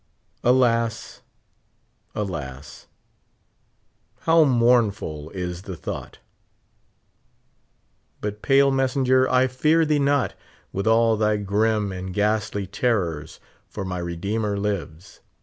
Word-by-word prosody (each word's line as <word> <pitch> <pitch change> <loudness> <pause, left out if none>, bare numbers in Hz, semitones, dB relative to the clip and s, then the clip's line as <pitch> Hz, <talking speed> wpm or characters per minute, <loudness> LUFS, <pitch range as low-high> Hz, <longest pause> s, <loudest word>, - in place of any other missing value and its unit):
Alas! 120 -2 +1 0.9
alas! 75 -9 -6 1.3
how 165 0 +5
mournful 115 - +1
is 90 -1 -5
the 95 -2 -7
thought! 80 - -7 2.0
But, 105 0 -5
pale 140 0 +4
messenger, 130 -1 +2
I 130 0 +4
fear 155 +6 +2
thee 150 -1 +2
not, 140 -1 +1 0.4
with 100 +2 -2
all 115 0 +4
thy 105 0 +2
grim 105 +1 0
and 95 0 -6
ghastly 105 -1 0
terrors, 90 -7 -2 0.3
for 105 - -7
m}' 95 - -4
Redeemer 100 +5 -2
lives. 95 -3 -4
105 Hz, 95 wpm, -23 LUFS, 95-125 Hz, 2.0 s, how